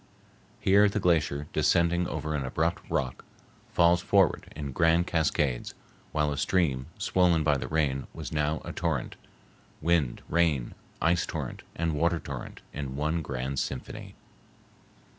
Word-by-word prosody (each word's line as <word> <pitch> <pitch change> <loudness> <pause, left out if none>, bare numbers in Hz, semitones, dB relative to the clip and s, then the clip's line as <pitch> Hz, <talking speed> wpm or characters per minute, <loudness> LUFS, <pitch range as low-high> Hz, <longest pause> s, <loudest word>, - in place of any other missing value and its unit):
Here 100 +2 +5
the 105 - -1
glacier, 80 -5 +1
descending 85 +1 +3
over 75 0 -3
an 75 -2 -1
abrupt 80 +6 -1
rock, 65 -1 -2 0.5
falls 85 +1 +4
forward 95 -2 +2
in 70 -2 -4
grand 85 +4 +3
cascades, 75 -7 0 0.4
while 75 -1 +1
a 70 - -3
stream 70 -8 +1
swollen 90 -4 +3
by 75 -1 +3
the 65 -1 -4
rain 70 -3 0
was - - -7
now 75 +1 0
a - - -4
torrent,—wind, 80 -1 -3
rain, 80 -7 +1 0.3
ice 85 +1 +2
torrent, - - -5
and 85 -1 0
water 85 +3 +1
torrent 70 -5 -7
in 70 -2 -4
one 80 +3 0
grand 65 -1 -3
symphony. 65 - -5
80 Hz, 135 wpm, -28 LUFS, 70-85 Hz, 0.5 s, Here